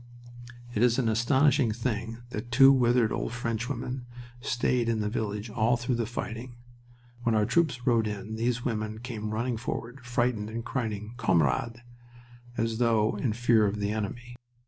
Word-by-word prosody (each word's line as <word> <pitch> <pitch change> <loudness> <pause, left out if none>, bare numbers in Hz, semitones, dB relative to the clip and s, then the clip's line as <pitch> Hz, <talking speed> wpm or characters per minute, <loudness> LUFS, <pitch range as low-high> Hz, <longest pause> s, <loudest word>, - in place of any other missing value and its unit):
It 105 - 0
is 120 -1 +4
an 130 -4 +1
astonishing 130 +3 +3
thing 115 0 -3
that 120 +2 -5
two 135 +2 +8
withered 120 -3 +3
old - - -2
French 115 -1 -2
women 125 -1 -4 0.3
stayed 120 -2 0
in 115 -1 +1
the 105 0 -1
village 105 -1 -3
all 115 +3 +2
through 120 +1 -1
the 115 -2 -1
fighting. 120 0 -5 0.7
When 115 -2 +1
our 105 -1 +3
troops 145 -4 +1
rode 115 -3 +3
in 105 +1 -5
these 120 +1 -1
women 110 -2 -2
came 115 -4 -5
running 115 +2 -1
forward, 120 +3 -5
frightened 120 -3 0
and 115 +1 -5
crying 110 -4 -3
"Camarades!" 115 - +1 0.8
as 115 0 -1
though 110 -3 +3
in 110 +1 0
fear 115 -2 +3
of 105 +1 -2
the 100 0 -1
enemy. 120 +3 -4
115 Hz, 165 wpm, -28 LUFS, 110-125 Hz, 0.8 s, two